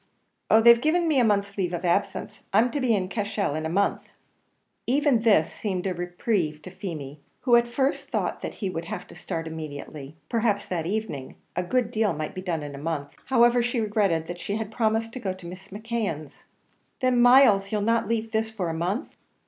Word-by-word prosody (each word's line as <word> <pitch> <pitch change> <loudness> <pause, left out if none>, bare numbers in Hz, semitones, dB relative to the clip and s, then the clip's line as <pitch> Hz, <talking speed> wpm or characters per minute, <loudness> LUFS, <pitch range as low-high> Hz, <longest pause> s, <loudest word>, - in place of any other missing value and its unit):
"Oh! 220 - +6
they've 235 +1 +7
given 335 +4 +2
me 300 -4 +3
a - - +5
month's 200 -2 +1
leave 180 -2 0
of 175 +1 -3
absence. 175 +3 -1
I'm 230 +5 +4
to 285 - -2
be 240 -4 +3
in 185 -2 -1
Cashel 205 -4 -2
in 155 +1 -2
a - - -4
month." 200 +4 0 0.8
Even 280 -1 +3
this 200 -8 +4
seemed 190 -4 -3
a 190 - 0
reprieve 175 -3 -2
to 185 - -9
Feemy, 155 -7 -7 0.2
who 245 -2 +4
at 235 0 +4
first 265 +4 -1
thought - - -2
that - - -5
he 195 - -3
would 165 -1 -4
have - - -5
to - - -12
start 165 -3 -4
immediately, 150 -2 -7
perhaps 220 -3 0
that 170 -3 -3
evening, 200 -10 -3 0.2
a 180 - +1
good 235 +5 0
deal 220 -3 +1
might 155 0 -4
be 185 - -5
done 170 -5 -2
in 145 -1 -7
a 140 - -8
month; 145 -2 -3
now, - - -27
however, 240 -1 +4
she 240 0 -1
regretted 205 -7 +1
that 175 +1 -7
she 200 - -3
had 220 -1 -4
promised 225 0 0
to 255 - -5
go 195 -5 -2
to 185 -2 -13
Mrs. 185 +3 -10
M'Keon's. 205 - -4 0.5
"Then, 255 -1 +3
Myles, 240 -6 +6
you'll 210 -1 0
not 230 +2 +1
leave 225 -1 -1
this 220 0 0
for 200 -6 -3
a - - -2
month?" 180 - -2
200 Hz, 215 wpm, -26 LUFS, 170-230 Hz, 0.8 s, they've